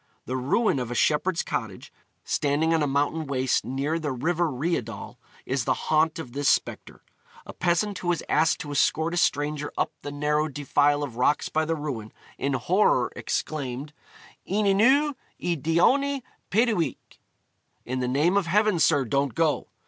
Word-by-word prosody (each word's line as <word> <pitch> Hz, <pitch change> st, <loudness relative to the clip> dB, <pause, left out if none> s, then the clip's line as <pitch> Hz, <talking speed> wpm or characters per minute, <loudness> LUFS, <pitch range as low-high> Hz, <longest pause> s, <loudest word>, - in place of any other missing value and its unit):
The 130 Hz, -, -3 dB
ruin 140 Hz, -, +1 dB
of 125 Hz, -2 st, -4 dB
a 120 Hz, -, -4 dB
shepherd's 165 Hz, +6 st, +1 dB
cottage, -, -, -5 dB, 0.3 s
standing 150 Hz, +3 st, +1 dB
on 165 Hz, -, +2 dB
a 145 Hz, -, +1 dB
mountain 145 Hz, +3 st, 0 dB
waste 130 Hz, -2 st, 0 dB
near 140 Hz, +5 st, -2 dB
the 150 Hz, -3 st, -3 dB
river 165 Hz, +6 st, 0 dB
Rheidol, 145 Hz, -1 st, -3 dB, 0.3 s
is 130 Hz, -2 st, -1 dB
the -, -, +2 dB
haunt 155 Hz, +1 st, +1 dB
of 140 Hz, -7 st, -7 dB
this 140 Hz, +2 st, +1 dB
spectre. -, -, -1 dB, 0.4 s
A -, -, -9 dB
peasant 180 Hz, +3 st, 0 dB
who 180 Hz, -, -6 dB
was 175 Hz, -1 st, 0 dB
asked 155 Hz, +1 st, +2 dB
to 145 Hz, -, -6 dB
escort 160 Hz, +3 st, +1 dB
a -, -, -2 dB
stranger 150 Hz, -2 st, 0 dB
up -, -, 0 dB
the 145 Hz, -, -6 dB
narrow 150 Hz, +1 st, 0 dB
defile 145 Hz, 0 st, +1 dB
of 125 Hz, -5 st, -6 dB
rocks 130 Hz, +4 st, +1 dB
by 160 Hz, 0 st, 0 dB
the 165 Hz, +1 st, -1 dB
ruin, 135 Hz, -8 st, -5 dB, 0.3 s
in 140 Hz, 0 st, -1 dB
horror 175 Hz, -, +2 dB
exclaimed, 145 Hz, -1 st, -4 dB, 0.5 s
'Yn 205 Hz, +3 st, 0 dB
enw 265 Hz, +10 st, +4 dB, 0.3 s
y 175 Hz, -1 st, -1 dB
daioni, 255 Hz, -, +2 dB, 0.3 s
peidiwch,' 215 Hz, -, +1 dB, 0.9 s
(in 130 Hz, +2 st, -3 dB
the 125 Hz, -, -1 dB
name 150 Hz, +9 st, +2 dB
of 195 Hz, -4 st, +1 dB
heaven, 210 Hz, 0 st, +2 dB
sir, 140 Hz, -2 st, +3 dB
don't 140 Hz, +2 st, 0 dB
go!) 160 Hz, -2 st, +1 dB
150 Hz, 165 wpm, -25 LUFS, 140-175 Hz, 0.9 s, enw